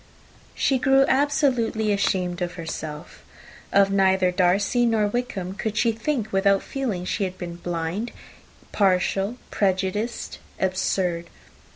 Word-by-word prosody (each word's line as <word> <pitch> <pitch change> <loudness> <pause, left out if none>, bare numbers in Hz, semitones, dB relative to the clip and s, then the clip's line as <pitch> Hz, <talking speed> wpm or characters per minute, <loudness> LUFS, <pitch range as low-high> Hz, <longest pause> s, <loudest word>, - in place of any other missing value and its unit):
She 265 -2 +2
grew 270 +1 +4
absolutely 255 -6 +2
ashamed 185 -3 0
of 175 0 -2
herself. 160 -3 -7 0.5
Of 195 0 +4
neither 190 -2 +3
Darcy 195 +6 +2
nor 220 -2 +2
Wickham 205 -5 -3
could 215 +1 -4
she 230 +1 +3
think, 225 -1 -2
without 195 0 +3
feeling 250 -10 -3
that - - -5
she 205 - -1
had 185 -1 -3
been 170 -2 -6
blind, 175 +6 -3 0.6
partial, 195 +3 +1
prejudiced, 200 +4 -1 0.2
absurd. 185 -2 0
195 Hz, 125 wpm, -24 LUFS, 180-225 Hz, 0.6 s, grew